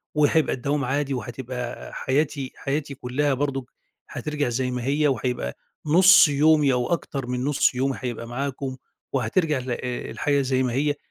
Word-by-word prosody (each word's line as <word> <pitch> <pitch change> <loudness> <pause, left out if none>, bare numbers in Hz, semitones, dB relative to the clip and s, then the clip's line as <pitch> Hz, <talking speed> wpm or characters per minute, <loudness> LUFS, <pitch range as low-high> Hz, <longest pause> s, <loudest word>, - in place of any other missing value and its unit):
وهيبقى 150 0 +3
الدوام 140 +2 -1
عادي 140 +1 -1
وهتبقى 125 -1 -6
حياتي 140 0 -1
حياتي 140 0 -3
كلها 135 +3 0
برضه 135 -1 -2 0.4
هترجع 150 -4 -2
زي 125 +1 -1
ما 125 -1 -3
هي، 145 +2 +2
وهيبقى 125 - -2 0.3
نُص 185 +4 +7
يومي 150 -1 +4
أو 125 -1 0
أكتر 135 -6 -3
من 125 0 -2
نُص 140 -2 +2
يومي 135 +1 0
هيبقى 120 -2 -4
معاكم، 130 +1 -4 0.4
وهترجع 140 +4 +1
ل 125 0 -5
آآ، 125 0 -4
الحاجة 145 -1 +1
زي 130 -1 +1
ما 125 -2 -1
هي، 145 +2 +1
135 Hz, 155 wpm, -24 LUFS, 125-145 Hz, 0.4 s, نُص